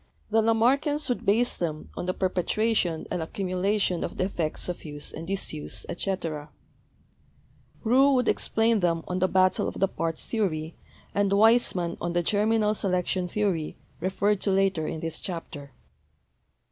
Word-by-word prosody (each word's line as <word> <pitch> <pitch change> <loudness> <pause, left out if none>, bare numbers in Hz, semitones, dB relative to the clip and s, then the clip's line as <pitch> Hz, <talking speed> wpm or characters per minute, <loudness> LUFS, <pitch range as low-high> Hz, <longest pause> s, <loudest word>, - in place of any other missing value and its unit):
The 225 +1 +4
Lamarckians 260 +7 +2
would 245 - -2
base 230 +5 +3
them 155 -3 -4
on 175 - -4
the 185 - +1
perpetuation 185 -1 0
and 175 - -1
accumulation 185 +2 -1
of - - -5
the - - +1
effects 170 -5 -2
of 180 - -5
use 145 -1 -6
and 165 - -7
disuse, 185 -6 -3
etc.; 165 -5 -3 1.3
Roux 260 +5 +5
would 250 -2 +2
explain 225 0 +2
them 170 -3 +1
on 180 0 -2
the 185 - +3
battle 185 0 +2
of - - -5
the 195 - +3
parts 165 -3 -3
theory 165 -8 -1 0.4
and 200 -1 +2
Weismann 205 -4 +3
on 170 0 -2
the 175 0 +1
germinal 215 +2 +2
selection 185 -2 -1
theory, 180 -5 -1 0.2
referred 190 +3 0
to - - +1
later 190 -4 +2
in 160 - -4
this 165 -1 -3
chapter. 165 -5 -5
185 Hz, 150 wpm, -26 LUFS, 170-215 Hz, 1.3 s, Roux